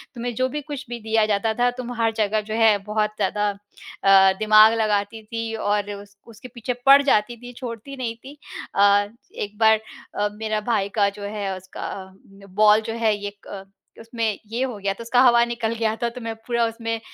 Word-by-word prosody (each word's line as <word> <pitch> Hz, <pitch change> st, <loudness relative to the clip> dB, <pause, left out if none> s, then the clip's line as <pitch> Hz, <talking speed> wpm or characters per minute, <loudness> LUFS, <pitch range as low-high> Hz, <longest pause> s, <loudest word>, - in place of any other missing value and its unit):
तुम्हें 240 Hz, 0 st, -4 dB
जो 255 Hz, 0 st, +1 dB
भी 295 Hz, +3 st, -4 dB
कुछ 290 Hz, -1 st, -7 dB
भी 240 Hz, -1 st, -5 dB
दिया 220 Hz, 0 st, +2 dB
जाता 215 Hz, +1 st, 0 dB
था, 245 Hz, +2 st, +2 dB
तुम 245 Hz, 0 st, -6 dB
हर 225 Hz, 0 st, +2 dB
जगह 215 Hz, 0 st, +1 dB
जो 215 Hz, +1 st, -7 dB
है 225 Hz, -2 st, +4 dB
बहुत 210 Hz, +1 st, 0 dB
ज़्यादा 205 Hz, +1 st, +1 dB, 0.5 s
अ, 195 Hz, -1 st, +6 dB
दिमाग 215 Hz, +1 st, +6 dB
लगाती 210 Hz, +1 st, -1 dB
थी 230 Hz, +1 st, -5 dB
और 205 Hz, -1 st, -1 dB
उस 200 Hz, 0 st, -18 dB
उसके 230 Hz, +2 st, -12 dB
पीछे 240 Hz, +2 st, -3 dB
पड़ 275 Hz, +1 st, +8 dB
जाती 235 Hz, -3 st, +1 dB
थी, 245 Hz, +1 st, -11 dB
छोड़ती 245 Hz, +2 st, -8 dB
नहीं 235 Hz, -3 st, -3 dB
थी। 270 Hz, +5 st, -13 dB, 0.4 s
अ, 200 Hz, 0 st, +4 dB, 0.3 s
एक 205 Hz, 0 st, -6 dB
बार 220 Hz, -1 st, +5 dB, 0.3 s
अ, 205 Hz, 0 st, 0 dB
मेरा 215 Hz, 0 st, -3 dB
भाई 200 Hz, -3 st, 0 dB
का 200 Hz, -, +4 dB
जो 200 Hz, 0 st, -11 dB
है 200 Hz, -2 st, -4 dB
उसका 185 Hz, 0 st, -8 dB, 0.7 s
बॉल 215 Hz, +1 st, +5 dB
जो 225 Hz, -, -3 dB
है 215 Hz, -, +3 dB
ये 205 Hz, 0 st, -6 dB
क 195 Hz, -1 st, -8 dB, 0.4 s
उसमें 225 Hz, -2 st, -3 dB
ये 240 Hz, +3 st, -1 dB
हो 250 Hz, -5 st, -4 dB
गया, 195 Hz, 0 st, -1 dB
तो 215 Hz, -, -12 dB
उसका 245 Hz, +2 st, +3 dB
हवा 240 Hz, -2 st, +6 dB
निकल 235 Hz, -1 st, -2 dB
गया 220 Hz, -1 st, 0 dB
था, 235 Hz, -, +1 dB
तो 250 Hz, +2 st, -10 dB
मैं 225 Hz, -1 st, -5 dB
पूरा 235 Hz, -1 st, +1 dB
उसमें 230 Hz, 0 st, -3 dB
220 Hz, 205 wpm, -22 LUFS, 205-235 Hz, 0.7 s, पड़